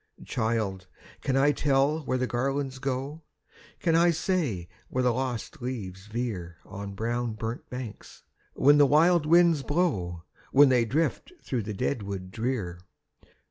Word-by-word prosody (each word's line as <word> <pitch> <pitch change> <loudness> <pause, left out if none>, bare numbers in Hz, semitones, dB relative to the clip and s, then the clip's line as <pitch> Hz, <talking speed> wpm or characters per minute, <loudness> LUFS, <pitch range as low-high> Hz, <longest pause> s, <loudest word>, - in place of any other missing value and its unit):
"Child! 110 -5 -1 0.3
can 135 -1 0
I 140 +2 +5
tell 145 +1 +2
where 130 - +1
the 130 - 0
garlands 135 +2 -2
go? 135 +3 -3 0.6
Can 165 -2 +1
I 170 +1 +5
say 155 - -1 0.2
where 130 - 0
the 125 -1 +3
lost 125 -1 -4
leaves 100 -6 -5
veer 105 -7 -4
On 100 0 -7
the 100 - -9
brown 120 +2 -2
burnt 110 +2 -5
banks, 125 -4 -8 0.3
when 145 +2 +5
the 145 - +7
wild 160 +3 +4
winds 170 -2 +5
blow, 100 - -1 0.3
When 140 0 +7
they 125 -2 +3
drift 155 - -1
through 125 -3 -2
the 105 0 -5
dead 125 +2 -1
wood 95 -2 -6
drear? 110 -6 -3
125 Hz, 150 wpm, -27 LUFS, 105-145 Hz, 0.6 s, the